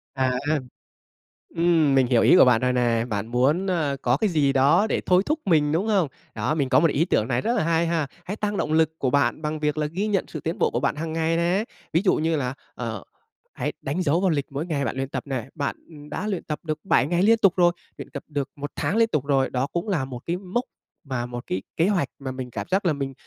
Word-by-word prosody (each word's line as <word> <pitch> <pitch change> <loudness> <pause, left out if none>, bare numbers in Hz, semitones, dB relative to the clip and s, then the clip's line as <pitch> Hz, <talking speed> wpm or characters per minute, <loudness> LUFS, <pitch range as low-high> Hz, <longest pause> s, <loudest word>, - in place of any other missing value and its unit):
À. 130 -1 +1 1.2
Ừm, 165 -4 +3
mình 130 -2 +4
hiểu 120 -2 +3
ý - - +6
của - - +8
bạn 120 -3 +4
rồi 125 0 +1
nè. 120 -2 +1
Bạn 105 0 -2
muốn, 135 +11 +1
ơ, 155 -6 0
có 125 +2 +2
cái 215 - +1
gì 145 -5 +2
đó 145 +10 +4
để - - 0
thôi 180 +1 +4
thúc 305 +1 0
mình, 150 -5 +3
đúng 175 +7 0
không? 195 -7 +2 0.3
Đó, 110 +8 -1
mình 140 -4 0
có 130 - +5
một 165 +1 +4
ý 160 - +2
tưởng 110 - +1
này 125 -1 0
rất 235 - 0
là 215 - +1
hay 165 +1 +1
ha, 165 -3 0 0.2
hãy 200 - -4
tăng 210 -1 -2
động 150 - -1
lực 160 0 +2
của 130 - +1
bạn 140 +3 +1
bằng 155 0 -3
việc 150 0 -1
là 150 -1 0
ghi 185 +7 -2
nhận 200 -3 0
sự 155 - -6
tiến 165 +3 -4
bộ - - +2
của 120 - 0
bạn 140 +3 0
hàng 160 +1 -4
ngày 165 0 +1
nè, 175 +5 +1 0.3
ví 165 - +3
dụ 190 - +4
như 160 +1 0
là, 130 -3 -2 0.2
ờ, 110 -5 -5 0.5
hãy - - -3
đánh 145 +7 -2
dấu 165 +1 +2
vào 190 - +3
lịch 145 -4 0
mỗi 140 +4 -3
ngày 145 -5 -1
bạn - - -2
luyện 135 0 -3
tập - - -4
này, 130 -2 -4
bạn 145 -3 -2 0.3
đã 210 - -4
luyện 195 -4 -2
tập 150 -2 -4
được 155 -2 -3
7 165 -7 +3
ngày 175 +3 +1
liên 225 +3 +5
tục 195 -5 +4
rồi, 175 -1 +4 0.3
luyện - - -8
tập - - -6
được 145 -3 -3
1 145 +1 -6
tháng - - -1
liên 230 0 +5
tục 150 - -1
rồi, 135 -2 +2
đó 130 +2 -1
cũng 170 +6 -3
là 155 -9 0
một 125 -2 -7
cái 170 +1 -1
mốc 195 +6 -2 0.4
mà 125 -3 -2
một 120 0 -6
cái 95 - -2 0.2
kế 165 - +3
hoạch 185 -9 +1
mà 135 -1 -5
mình 130 -1 -6
cảm - - -5
giác 195 +1 +1
là 170 - +3
mình 135 -1 -4
155 Hz, 265 wpm, -24 LUFS, 135-175 Hz, 1.2 s, của